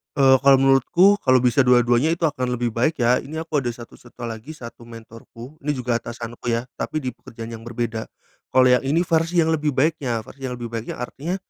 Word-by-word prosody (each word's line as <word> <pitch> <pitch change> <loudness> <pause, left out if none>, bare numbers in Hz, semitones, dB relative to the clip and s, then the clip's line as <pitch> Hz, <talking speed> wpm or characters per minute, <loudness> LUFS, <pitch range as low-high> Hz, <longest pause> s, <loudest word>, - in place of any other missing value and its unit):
Eee, 135 -1 +6
kalau 135 0 +6
menurutku 170 +10 +4
kalau 130 -5 +4
bisa 125 +2 +3
dua-duanya, 120 +4 +3
itu 170 0 -6
akan 125 -5 0
lebih 120 -1 -2
baik 155 +4 0
ya. 125 +2 +3
Ini 160 +3 -6
aku 155 -2 -1
ada 125 -3 -3
satu 120 -1 -13
satu 120 0 -13
lagi, 115 +7 -7
1 115 -2 -11
mentorku, 115 +4 -12
ini 150 +1 -2
juga 120 -2 -1
atasanku 120 +1 -8
ya, 115 0 0 0.2
tapi 155 - -3
di 130 - -1
pekerjaan 115 0 -10
yang 110 - -14
berbeda. 115 -1 -4 0.5
Kalau 130 0 +6
yang 125 - +4
ini 165 +5 +2
versi 165 0 +1
yang 160 - 0
lebih 150 -3 0
baiknya. 130 -6 0
Versi 135 +2 -8
yang 125 - -4
lebih 120 -1 -7
baiknya 115 -1 -5
artinya, 165 +9 -4
125 Hz, 210 wpm, -22 LUFS, 120-150 Hz, 0.5 s, Eee